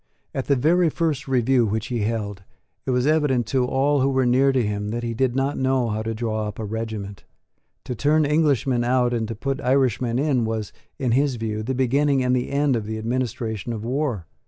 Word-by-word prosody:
At 135 Hz, -, -3 dB
the 140 Hz, -, +4 dB
very 165 Hz, +6 st, +3 dB
first 155 Hz, -4 st, -1 dB
review 125 Hz, -2 st, +2 dB
which 110 Hz, +1 st, -2 dB
he 120 Hz, -2 st, -1 dB
held, 105 Hz, -2 st, -2 dB, 0.5 s
it -, -, -1 dB
was 125 Hz, 0 st, +1 dB
evident 145 Hz, -5 st, +2 dB
to 130 Hz, -2 st, +2 dB
all 135 Hz, +2 st, +1 dB
who 135 Hz, -, +3 dB
were 130 Hz, -1 st, +1 dB
near 130 Hz, +3 st, +4 dB
to 130 Hz, -4 st, +1 dB
him 105 Hz, 0 st, -2 dB
that 120 Hz, +2 st, -3 dB
he 115 Hz, -1 st, -2 dB
did 125 Hz, +1 st, 0 dB
not 135 Hz, +2 st, 0 dB
know 130 Hz, -2 st, +1 dB
how 110 Hz, 0 st, -2 dB
to 115 Hz, 0 st, -3 dB
draw 110 Hz, -1 st, -2 dB
up 105 Hz, -, -7 dB
a 110 Hz, -, -4 dB
regiment. 105 Hz, -2 st, -5 dB, 0.6 s
To -, -, -4 dB
turn 150 Hz, +6 st, +2 dB
Englishmen 140 Hz, -5 st, +2 dB
out 125 Hz, 0 st, +2 dB
and 115 Hz, -2 st, -1 dB
to 115 Hz, -, -5 dB
put 135 Hz, +5 st, -3 dB
Irishmen 125 Hz, -2 st, +1 dB
in 135 Hz, -3 st, +1 dB
was, 110 Hz, -2 st, -3 dB, 0.2 s
in 130 Hz, -4 st, -1 dB
his 135 Hz, +2 st, +2 dB
view, 110 Hz, -2 st, -3 dB
the 130 Hz, +4 st, -2 dB
beginning 135 Hz, +2 st, +2 dB
and 125 Hz, 0 st, +2 dB
the 125 Hz, -, -1 dB
end 140 Hz, -1 st, +1 dB
of 110 Hz, -2 st, -3 dB
the 110 Hz, 0 st, -3 dB
administration 115 Hz, -1 st, -3 dB
of 110 Hz, -1 st, -5 dB
war. 125 Hz, -, -1 dB
125 Hz, 215 wpm, -23 LUFS, 110-135 Hz, 0.6 s, the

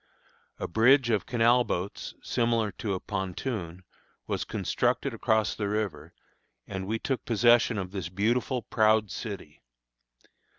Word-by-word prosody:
A -, -, -3 dB
bridge 120 Hz, +5 st, +4 dB
of 105 Hz, -3 st, 0 dB
canal 120 Hz, +1 st, +4 dB
boats, 95 Hz, -3 st, -4 dB
similar 115 Hz, -3 st, +1 dB
to 100 Hz, +1 st, -3 dB
a -, -, -3 dB
pontoon, 95 Hz, -2 st, -4 dB, 0.4 s
was -, -, -2 dB
constructed -, -, -1 dB
across 110 Hz, -1 st, +1 dB
the 105 Hz, -2 st, -3 dB
river, 95 Hz, -7 st, -3 dB, 0.5 s
and 95 Hz, -1 st, -5 dB
we 110 Hz, +2 st, 0 dB
took 130 Hz, +3 st, -2 dB
possession 120 Hz, 0 st, +4 dB
of 95 Hz, -2 st, -4 dB
this 95 Hz, -4 st, -4 dB
beautiful, 115 Hz, +6 st, 0 dB
proud 110 Hz, -2 st, +2 dB
city. -, -, -7 dB
110 Hz, 130 wpm, -28 LUFS, 95-120 Hz, 0.5 s, bridge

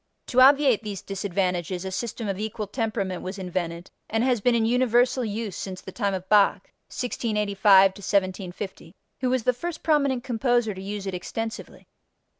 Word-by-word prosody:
To 255 Hz, -, +4 dB
obviate 270 Hz, -4 st, +6 dB
these 205 Hz, -3 st, -6 dB
disadvantages 185 Hz, -2 st, -2 dB
a 190 Hz, -, -4 dB
system 230 Hz, +2 st, -4 dB
of 195 Hz, -1 st, -3 dB
equal 215 Hz, 0 st, -3 dB
temperament 205 Hz, -4 st, -3 dB
was 185 Hz, +2 st, -6 dB
invented 175 Hz, -2 st, -4 dB, 0.2 s
and 225 Hz, +1 st, +1 dB
has 250 Hz, -4 st, +1 dB
been 245 Hz, +3 st, +3 dB
in 225 Hz, -1 st, +2 dB
universal 250 Hz, +1 st, +2 dB
use 215 Hz, -2 st, -4 dB
since 185 Hz, -1 st, -6 dB
the 190 Hz, -, -10 dB
time 200 Hz, -2 st, -1 dB
of 185 Hz, 0 st, -6 dB
Bach 205 Hz, -1 st, +3 dB, 0.2 s
(1685 205 Hz, -5 st, +3 dB
1750) 190 Hz, -2 st, -3 dB, 0.2 s
who 255 Hz, -, 0 dB
was 255 Hz, -2 st, +1 dB
the 250 Hz, -, +3 dB
first 325 Hz, +6 st, -6 dB
prominent 280 Hz, -5 st, +2 dB
composer 240 Hz, -3 st, +1 dB
to 190 Hz, -, -9 dB
use 200 Hz, +1 st, -5 dB
it 195 Hz, -, -3 dB
extensively. 225 Hz, +5 st, -6 dB
210 Hz, 165 wpm, -25 LUFS, 190-240 Hz, 0.2 s, obviate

